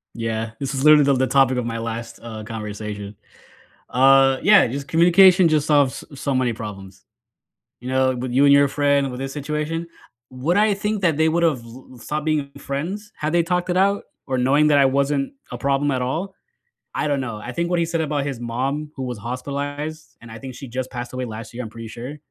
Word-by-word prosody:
Yeah. 115 -1 -3
This 140 0 -3
is 135 +1 -2
literally 150 -1 +7
the 140 0 +3
the 130 0 +1
topic 130 -2 +3
of 120 - -2
my 115 -1 -3
last, 115 +1 -5
uh, 110 -2 -7
conversation. 105 -2 -6 0.7
Uh, 135 +1 +5
yeah, 205 -1 +6
just 140 +3 -5
communication 175 +2 +6
just 155 -2 +1
solves 145 -4 +2
s 140 - -11
so 140 - -1
many 130 -2 +1
problems. 100 -4 -9 0.8
You 125 - -7
know, 130 0 +2
with 125 0 -4
you 135 +3 +4
and 140 - +6
your 140 0 +6
friend, 140 -1 +1
with 125 - -7
this 135 0 -4
situation, 150 +3 -3 0.4
would 140 +9 -1
I 210 0 +4
think 210 +1 -2
that 165 -6 +2
they 160 0 +3
would've 160 -6 +1
l 120 +3 -13
l - - -13
stopped 150 +5 -4
being 150 -3 0
friends 185 +10 -5
had 155 +1 -3
they 170 -1 +3
talked 180 +1 -1
it 180 - +1
out, 200 +2 +2 0.2
or 130 -1 -1
knowing 140 +4 +3
that 150 -1 +4
I 140 - +6
wasn't 140 +1 0 0.2
a - - -5
problem 140 +1 0
at 130 -1 -1
all? 165 +10 -3 0.6
I - - -1
don't 140 -2 0
know, 115 -5 -4
I 120 +4 -7
think 170 +6 -2
what 175 - +1
he 170 - +1
said 165 0 -2
about 145 -2 -1
his 135 -4 -4
mom, 135 +6 -3
who 135 - -5
was 125 -3 -5
hospitalized, 145 +6 -5
and 115 - -13
I 110 - -9
think 130 +1 -8
she 135 +2 -9
just 130 +2 -4
passed 120 -1 -6
away 130 0 -3
last 110 -1 -8
year, 125 - -4
I'm 110 - -7
pretty 115 0 -9
sure, 125 +6 -7
135 Hz, 225 wpm, -22 LUFS, 125-150 Hz, 0.8 s, literally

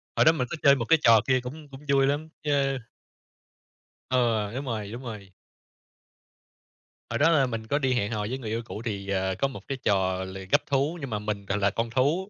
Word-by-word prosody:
Hồi - - +4
đó 160 - +8
mình 130 -6 -2
có 170 - -4
chơi 140 -1 +7
một 115 -4 -2
cái 165 +2 +4
trò 115 -2 +7
kia 130 -1 +4
cũng 145 +5 -8
cũng 135 +2 -12
vui 135 -1 +4
lắm, 150 +3 -1
ch - - -8 1.6
Ừ, 115 -5 +1
đúng 135 +2 -4
rồi, 110 -4 -4
đúng 120 +3 -7
rồi. 105 -5 -8 1.8
Hồi - - -1
đó 160 +3 +5
là 140 -5 +4
mình 115 -2 -4
có 145 +4 +1
đi 130 -2 +1
hẹn 105 -3 0
hò 105 -2 -2
với 130 - -2
người 115 -5 -6
yêu 115 +1 -1
cũ, 110 - -7
thì, 100 -3 -4
ờ, 95 -1 0
có 135 - +1
một 135 - -10
cái 135 - -3
trò 95 -2 +1
là 95 +1 -7
gắp - - +5
thú, 140 +4 0
nhưng 135 - -5
mà 105 - -2
mình 105 -1 -4
gọi 100 +1 -1
là 100 -1 +2
con 115 +3 -2
thú. 150 - +1
120 Hz, 230 wpm, -27 LUFS, 105-140 Hz, 1.8 s, đó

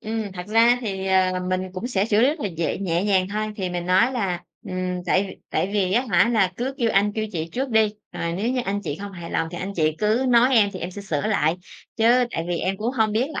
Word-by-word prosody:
Ừm, 220 -2 -4
thật 180 0 -7
ra 230 +3 +5
thì, 195 -4 -4
ờ, 185 -1 +3 0.2
mình 185 0 0
cũng 190 +6 -4
sẽ 205 -5 0
xử 215 0 +2
lý 255 - +5
rất 305 +1 -2
là 205 - -1
dễ 165 -2 -2
nhẹ 180 -1 -1
nhàng 190 -2 +2
thôi. 215 +1 -3
Thì 185 -3 -3
mình 175 0 -4
nói 225 +8 +4
là 185 -7 -2 0.3
"Ừm, 180 -1 -3
tại 190 - +3
v - - -6 0.2
tại 195 - 0
vì, 190 -3 +1
á 245 +4 +2
hả, 180 +5 +4
là 195 -5 +2
cứ 265 +3 -3
kêu 230 -2 +2
anh 205 +1 +2
kêu 220 0 -2
chị 165 -1 -3
trước 265 +2 -2
đi, 220 -1 +4 0.2
rồi 170 0 -3
nếu 200 +7 -1
như 255 -1 0
anh 200 +1 -1
chị 145 - -4
không 200 -1 -6
hài 170 -2 -8
lòng 165 - -1
thì 175 - -6
anh 195 +2 -4
chị 155 -2 +2
cứ 220 +5 +1
nói 250 +2 +5
em 205 -3 +5
thì 185 - -7
em 175 - -4
sẽ 200 +2 -8
sửa 155 -7 -2
lại, 155 +5 +1 0.4
chứ 240 +2 +4
tại 165 - -3
vì 175 -1 -1
em 190 +1 -1
cũng 230 +5 -2
hông 220 -4 +1
biết 245 +6 +1
là - - -3
200 Hz, 280 wpm, -23 LUFS, 180-225 Hz, 0.4 s, ra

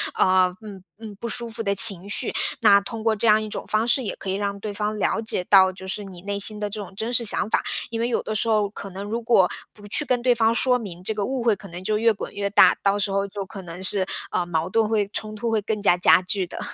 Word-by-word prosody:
呃， 185 -1 +3
嗯， 200 -4 -11 0.2
嗯， 215 -2 -9
不 235 +4 -6
舒 235 +1 -4
服 225 0 -6
的 200 -2 0
情 200 -2 +6
绪。 230 - 0 0.3
那 205 -3 +5
通 225 +2 -7
过 220 0 +1
这 215 - -3
样 215 -1 +5
一 215 - -5
种 210 - -6
方 215 +2 0
式 260 +2 +2
也 215 - -4
可 195 - -6
以 - - 0
让 200 0 -3
对 205 0 -6
方 210 +1 -3
了 220 - 0
解 220 -5 -2
到， 190 -1 +5
就 190 0 -11
是 205 +2 -4
你 185 -3 -10
内 200 0 -3
心 210 +1 +1
的 210 0 -3
这 210 +1 -6
种 190 0 -12
真 225 +3 -3
实 235 -1 +3
想 215 0 +1
法， - - +1 0.3
因 230 -1 -4
为 235 - 0
有 240 - 0
的 215 - -5
时 225 +2 0
候 210 -2 +2
可 200 -1 -9
能 195 +2 -7
如 225 +3 -3
果 225 -6 +3 0.2
不 205 -1 -15
去 260 - +1
跟 250 -4 -1
对 245 0 +3
方 225 0 +2
说 250 +1 +2
明， 190 -7 -9
这 205 +4 -2
个 210 -1 -3
误 260 +1 -3
会 230 -2 +2
可 195 0 -13
能 175 +1 -8
就 210 +3 -1
越 230 +1 +3
滚 205 - -7
越 200 0 -2
大， 205 - +5
到 200 +1 +2
时 200 - -1
候 195 0 0
就 200 0 -6
可 195 0 -9
能 175 0 -9
是， 190 0 +3 0.3
呃， 180 - -1
矛 165 -1 -2
盾 220 +2 +1
会 210 -2 +1
冲 215 0 -4
突 215 - -7
会 220 -2 +1
更 215 0 -3
加 195 -3 +4
加 180 - +5
剧 190 +1 0
的。 - - -8
205 Hz, 310 characters per minute, -23 LUFS, 195-225 Hz, 0.3 s, 情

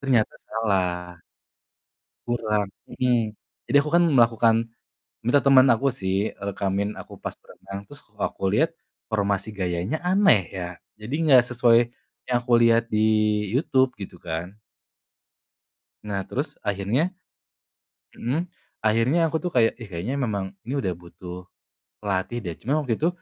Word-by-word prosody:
Ternyata 125 -6 +2
salah. 90 -5 -1 1.1
Kurang 110 -4 0 0.2
mhm. 120 -4 +1 0.4
Jadi 145 - +2
aku 150 +2 +1
kan 175 - +6
melakukan 115 -4 +4 0.7
minta 135 +4 +5
teman 135 -1 +7
aku 135 +5 0
sih, 95 -1 -1
rekamin 100 +1 -2
aku - - -10
pas - - -4
berenang. 100 0 -9
Terus, 145 0 -9
kok 105 0 -31
aku 95 - -1
lihat, 160 +6 +2 0.4
formasi 100 -1 0
gayanya 90 - -2
aneh, 185 - +4
ya. 90 -2 -4 0.3
Jadi, 115 +6 -6
nggak 130 -5 +8
sesuai 120 -1 +4 0.5
yang 125 - +3
aku 120 0 -1
lihat 115 0 +4
di 110 0 +2 0.5
YouTube, 130 -1 +2
gitu 90 -2 -8
kan. 85 +2 -4 1.5
Nah, 100 -2 -2
terus 140 +4 -3
akhirnya 105 - 0 1.1
mhm, 150 +10 -2 0.3
akhirnya 115 +10 +3
aku 160 - -1
tuh 180 - -2
kayak, 115 -3 +3
"Ih, 115 - -8
kayaknya 95 +11 -3
memang 100 -8 -2
ini 125 +4 -5
udah 95 -8 -1
butuh 90 +1 -10 0.6
pelatih, 100 +4 -1
deh." 85 - -3
Cuma, 150 +6 0
waktu 115 -4 -1
itu, 160 - +3
115 Hz, 135 wpm, -24 LUFS, 100-130 Hz, 1.5 s, nggak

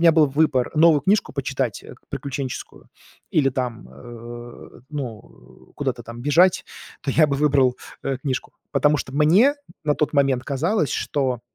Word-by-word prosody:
меня 170 0 +7
был 155 -2 +5
выбор 140 -3 +1
новую 155 -2 +5
книжку 195 +5 +2
почитать 135 -4 -2 0.3
приключенческую 135 -2 -6 0.4
или 140 -3 +3
там, 125 - -4
э, 120 - -11
ну, 125 -8 -9
э, - - -23
куда-то - - -3
там 115 +1 -9
бежать, 165 +7 +4 0.4
то 140 - -2
я 155 -2 +5
бы 140 - 0
выбрал, 135 -3 +3 0.3
э, 135 -1 -1
книжку. 130 -2 -3 0.2
Потому 150 0 +3
что 130 - -5
мне 185 - +5 0.3
на 150 -1 +2
тот 150 - 0
момент 135 -3 +2
казалось, 155 - 0
что 130 -4 -1
140 Hz, 150 wpm, -22 LUFS, 125-150 Hz, 0.4 s, меня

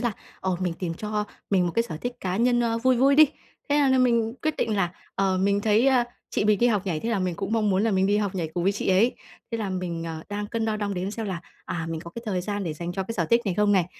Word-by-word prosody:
là, 240 -3 0 0.3
ờ, 185 -2 0
mình 180 -2 0
tìm 170 -3 -3
cho 210 +2 -2 0.3
mình 185 -3 +3
một 170 - -2
cái 230 - +3
sở 165 -9 -6
thích 245 +10 -4
cá 185 0 -2
nhân, 240 +1 +3
ơ, 230 -1 +1
vui 255 +2 +3
vui 270 +3 +5
đi. 310 - +10 0.4
Thế 290 - +3
là 285 -2 +4
là 260 0 +4
mình 235 -2 +2
quyết 310 -1 0
định 215 -2 0
là, 180 -3 +1 0.2
ờ, 190 -1 +1
mình 200 +2 +2
thấy, 215 +4 +3
à, 255 -3 +4 0.3
chị - - 0
mình 210 -1 +4
đi 240 - +4
học 210 -4 +1
nhảy 165 -5 -1
thế 230 - -3
là 225 -4 +1
mình 180 -2 -1
cũng 195 +4 -4
mong 215 -2 +2
muốn 190 +1 +2
là 225 - +2
mình 190 -1 +2
đi 205 +1 +3
học 205 -2 -1
nhảy 170 -4 -2
cùng 175 - -1
với 195 +3 +3
chị 205 - -3
ấy. 195 +6 +4 0.4
Thế 230 - -2
là 205 -3 -2
mình, 180 -3 -3
ờ, 160 -1 -5
đang 205 0 -3
cân 225 +1 -2
đo 220 -1 0
đong 205 -1 -2
đếm 185 +2 -2
xem 220 0 -4
là, 180 -3 -3 0.2
à, 165 -1 -3
mình 160 - -3
có 170 0 -9
cái 235 - -6
thời 185 -3 0
gian 205 +1 -3
để 165 - -2
dành 170 +3 -5
cho 190 - -2
cái 225 +4 -5
sở 170 -6 0
thích 235 +1 +5
này 190 -3 0
không 210 0 +3
này, 185 -3 +4
205 Hz, 315 wpm, -25 LUFS, 185-230 Hz, 0.4 s, đi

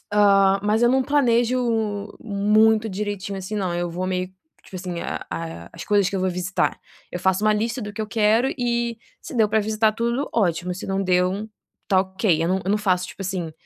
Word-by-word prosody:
Ah, 195 -1 +4
mas 215 +3 +1
eu 240 - +5
não 260 +1 +3
planejo 250 -3 +2 0.6
muito 215 +1 +3
direitinho 200 -1 -4
assim 190 +3 -6
não, 185 -3 -1
eu 175 0 -1
vou 180 +2 -3
meio, 185 0 -1 0.4
tipo - - -16
assim, 180 -2 -5
a - - -4
a 85 0 -6
as - - -8
coisas 200 -2 +2
que 195 - -2
eu - - -1
vou 185 - +1
visitar, 180 +1 -1 0.3
eu 180 - -3
faço 190 +3 +1
uma 215 - +5
lista 230 +4 -1
do 205 0 -6
que 220 +1 -4
eu - - -4
quero 220 +4 +3
e, 235 -1 -1 0.2
se 305 - -9
deu 220 -2 +4
para 220 +1 +2
visitar 215 +1 +1
tudo, 235 +5 -1
ótimo, 180 -4 0
se 185 - -7
não 195 0 -1
deu, 185 +3 +1 0.4
está 190 -1 +3
ok, 190 -3 0
eu - - 0
não 190 +1 +1
eu 195 - -1
não 210 - +2
faço 185 -3 +1
tipo 195 - -9
assim, 180 -4 -3
200 Hz, 215 wpm, -23 LUFS, 185-220 Hz, 0.6 s, eu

